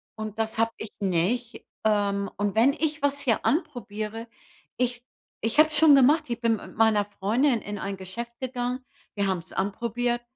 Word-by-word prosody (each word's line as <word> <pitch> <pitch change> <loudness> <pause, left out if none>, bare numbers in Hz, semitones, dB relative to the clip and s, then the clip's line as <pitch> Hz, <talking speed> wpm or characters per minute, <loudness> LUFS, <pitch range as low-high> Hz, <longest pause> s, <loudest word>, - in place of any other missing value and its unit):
und 215 0 -6
das 220 0 -2
habe 225 0 +3
ich 215 - -7
nicht. 200 +6 -1 0.2
Ähm, 200 -2 +1
und 205 -1 0
wenn 250 +5 +5
ich 300 -2 -2
was 285 0 +1
hier 250 -6 +1
anprobiere, 225 - -2 0.5
ich 245 -1 -1 0.4
ich 225 +4 -1
habe 310 +1 +7
es 305 - -2
schon 300 -2 +8
gemacht, 290 +4 +5
ich 240 -1 -4
bin 230 -1 +2
mit - - -12
meiner 215 -2 +3
Freundin 225 +5 +1
in 205 0 -6
ein 195 +1 -3
Geschäft 210 +6 -7
gegangen, 250 0 -3 0.3
wir 200 -1 0
haben 190 -2 0
es 165 - -13
anprobiert, 235 +5 -1
230 Hz, 180 wpm, -26 LUFS, 205-250 Hz, 0.5 s, schon